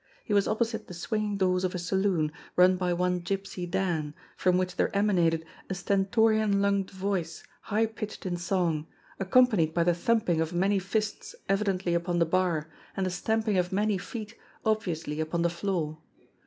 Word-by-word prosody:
He 215 - -3
was 200 -1 +3
opposite 220 0 -1
the 180 - -8
swing 215 +5 -2
ing 205 -1 -2
doors 185 -1 +2
of 185 0 -1
a - - 0
saloon, 180 -3 +1 0.2
run 180 +1 +6
by 180 -1 -1
one 180 0 0
Gypsy 190 -1 -4
Dan, 160 -6 -1 0.2
from 180 -1 +2
which 185 0 -1
there - - +1
emanated 175 -6 +2 0.2
a 190 - -2
stentorian 205 +2 +2
lunged 200 -1 +1
voice 190 -3 -3 0.2
high 220 +2 +1
pitched 215 -2 -7
in 180 -1 -1
song, 175 -3 0 0.3
accompanied 195 -5 +3
by 170 - +3
the 175 +1 +3
thumping 175 -2 +1
of 160 +2 -2
many 195 +3 +2
fists 210 +3 -3
evidently 195 -3 +1
upon 170 +1 0
the 170 - +4
bar, 170 -3 +1 0.3
and 190 - +1
the 185 - -1
stamping 220 +2 0
of 180 0 -1
many 205 0 +1
feet 215 +3 -7 0.3
obviously 170 -8 -1
upon 160 +2 -1
the 170 - +2
floor. 170 -4 -2
185 Hz, 175 wpm, -28 LUFS, 175-205 Hz, 0.3 s, run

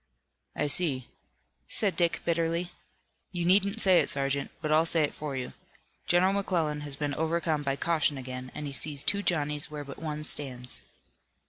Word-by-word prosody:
"I - - 0
see," 145 -4 +2 0.6
said 200 -4 +1
Dick 170 -2 +2
bitterly. 170 +1 0 0.6
"You 175 -2 -2
needn't 200 +4 +3
say 190 -4 +5
it, - - +1
sergeant, 140 0 -1
but 155 -2 -3
I'll 160 +2 +4
say 165 -1 +3
it 145 - -1
for 150 -2 -5
you. 125 -1 -4 0.5
General 185 +2 +4
McClellan 165 -7 0
has 145 -2 -4
been 145 0 -2
overcome 160 0 0
by 135 -1 -1
caution 155 -2 +1
again, 130 -1 -7
and 150 - -5
he 140 - -5
sees 140 +2 +3
two 200 0 +1
Johnnies 150 -6 +1
where 150 -1 -6
but 140 -1 -10
one 150 -1 -4
stands." 125 -5 -2
150 Hz, 170 wpm, -29 LUFS, 140-170 Hz, 0.6 s, say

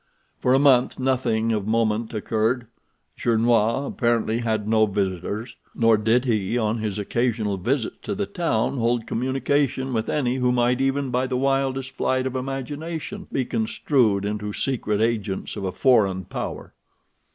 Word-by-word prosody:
For 130 +1 +4
a - - +5
month 135 -3 +4
nothing 125 -4 +1
of 105 -2 -1
moment 110 0 +1
occurred. 115 +2 0 0.5
Gernois 115 +2 +2
apparently 115 -3 0
had 110 -3 -1
no 110 0 +4
visitors, 100 +4 -3 0.2
nor 115 -1 +4
did 115 +4 +2
he 110 -2 0
on 110 -1 0
his 105 -2 -2
occasional 110 -1 -1
visits 120 +5 -1
to 205 - -4
the 205 +1 -1
town 140 - -1
hold 115 0 +1
communication 130 +1 0
with 110 -1 -1
any 130 -3 0
who 125 -1 +2
might 125 +1 +2
even 135 0 0
by 125 +1 +1
the 130 -1 -1
wildest 135 0 0
flight 130 0 0
of 130 0 -3
imagination 145 +8 -5
be 130 - 0
construed 110 -2 +1
into 105 0 -3
secret 110 -6 -1
agents 110 -4 -1
of 95 - -4
a 95 - -1
foreign 100 -7 +2
power. - - -6
120 Hz, 150 wpm, -24 LUFS, 110-130 Hz, 0.5 s, a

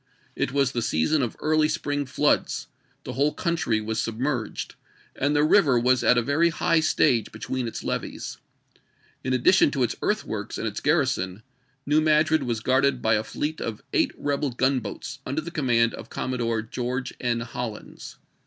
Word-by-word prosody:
It - - -1
was 140 -1 +2
the 120 - -2
season 120 - +1
of 120 -4 -1
the - - -23
early 155 0 +3
spring 145 -3 -2
floods; 145 +3 +1 0.4
the - - -6
whole 145 +4 +1
country 165 -10 0
was 110 +1 -3
sub 115 -1 -4
merged, 130 -3 -2 0.4
and 145 +2 0
the 145 - +4
river 150 -5 +5
was 125 +1 +2
at 125 - +5
a 120 - +3
very 155 +6 +3
high 165 0 +2
stage 135 -7 +2
between 125 +3 -3
its 115 - -6
levees. - - -4 0.8
In 130 - -2
addition 130 +8 +4
to 140 -3 0
its 120 - 0
earthworks 110 - -2
and - - -3
its 105 -2 -3
garrison. 130 - 0 0.4
New 150 +2 +3
Madrid 155 0 +3
was 120 -4 -2
guarded 130 +1 +2
by 110 - +3
a 110 0 +2
fleet 150 +7 -4
of 115 -2 -4
eight - - +3
rebel 145 0 -1
gunboats 130 +1 -2
under 140 +5 -3
command 120 -7 +2
of 115 - -9
Commodore 115 -3 -2
Oeorge 125 +3 -3
N. 120 -1 0
HoUins. 115 -2 -7
130 Hz, 170 wpm, -25 LUFS, 115-150 Hz, 0.8 s, river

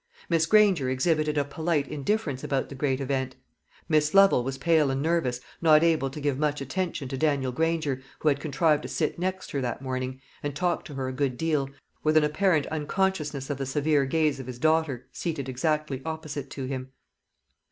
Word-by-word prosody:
Miss 165 -1 +3
Granger 195 -10 +4
exhibited 150 +3 +1
a 145 - +2
polite 155 0 -1
indifference 145 -3 -2
about 135 -1 -1
the - - -7
great 135 -1 0
event; 135 -1 -2 0.5
Miss 155 +1 +2
Lovel 195 -10 +6
was 135 +1 -3
pale 155 0 +3
and 135 0 -1
nervous, 145 -5 0 0.2
not 155 -1 +6
able 160 -5 +2
to 140 - -8
give 145 -2 -1
much 150 -1 0
attention 155 +1 -3
to 135 -1 -4
Daniel 140 -4 +1
Granger, 160 -2 0 0.2
who - - -3
had 140 -1 +1
contrived 150 +1 +2
to - - -6
sit 155 0 -1
next 185 +1 -3
her 140 - -1
that 125 +1 -3
morning, 130 0 -3 0.2
and 145 -1 -4
talked 175 +2 -1
to 145 - -9
her 135 -1 -2
a 130 - -3
good 130 -2 -1
deal, 150 -4 0 0.3
with 155 0 +3
an 155 - +5
apparent 155 0 +2
unconsciousness 155 -3 -1
of 140 - -4
the 135 - -2
severe 145 +1 +2
gaze 150 0 +1
of 130 - -7
his 125 -2 -6
daughter, 155 -3 +1
seated 155 -6 -3
exactly 145 +1 -1
opposite 155 -3 -5
to 135 - -5
him. 130 0 -4
145 Hz, 195 wpm, -27 LUFS, 135-160 Hz, 0.5 s, Lovel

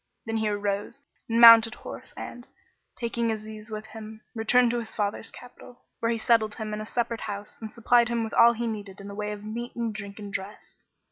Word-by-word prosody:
Then 225 0 -2
he 220 -1 0
arose 205 +4 -2 0.3
and 230 +1 +2
mounted 230 0 +9
horse - - -9
and, 245 +1 -8 0.5
taking 235 -1 -1
Aziz 215 0 -7
with 215 0 -6
him, 220 0 -10
returned 240 +1 +4
to 240 - 0
his 225 -2 -7
father's 210 +1 -1
capital, 245 0 -13 0.2
where 230 - 0
he 230 - 0
settled 220 -2 +2
him 215 -1 -5
in 210 - -3
a 215 - -6
separate 235 -1 -2
house 205 -1 -6
and 220 -1 -6
supplied 235 +1 +3
him 235 -1 0
with 220 - -5
all 235 0 +7
he 235 +1 -3
needed 205 -4 -5
in 200 - -9
the 200 - -7
way 210 +1 -3
of 210 0 -7
meat 235 +3 -6
and 230 -2 -2
drink 200 -1 -7
and 205 -2 -8
dress. 200 +1 -7
220 Hz, 215 wpm, -27 LUFS, 210-235 Hz, 0.5 s, mounted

